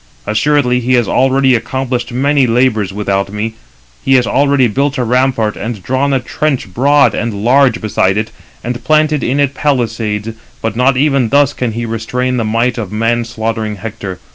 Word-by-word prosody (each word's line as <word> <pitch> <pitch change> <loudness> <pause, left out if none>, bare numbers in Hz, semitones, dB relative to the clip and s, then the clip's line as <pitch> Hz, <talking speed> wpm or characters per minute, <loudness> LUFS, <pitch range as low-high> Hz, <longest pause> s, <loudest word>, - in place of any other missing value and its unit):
Assuredly 125 +3 +1
he 125 +1 0
has 120 -2 +2
already 135 0 +2
accomplished 125 0 -2
many 135 +2 +2
labours 115 -4 +1
without 100 -1 -2
me. 105 +2 -3 0.5
He 135 - +3
has 125 -2 +3
already 140 -2 +2
built 140 +6 -1
a 125 - 0
rampart, 120 -3 +1
and 110 -4 -6
drawn 130 +2 0
a 135 - +2
trench 140 - -2
broad 140 +5 +3
[and] 115 +1 -2
large 130 -1 +4
beside 100 -2 0
it; 110 +1 -2 0.3
and 120 0 -4
planted 155 -1 +2
in 135 +4 0
it 140 -1 +1
palisades; 115 -7 -1 0.3
but 110 -1 -3
not 125 +2 +2
even 135 -4 +2
thus 140 +1 +3
can 120 -3 -3
he 120 +1 -3
restrain 125 +3 -2
the 115 - 0
might 115 +3 0
of 105 -5 -5
man 115 +2 0
slaughtering 110 -2 -3
Hector. 100 -2 -7
125 Hz, 175 wpm, -14 LUFS, 110-135 Hz, 0.5 s, large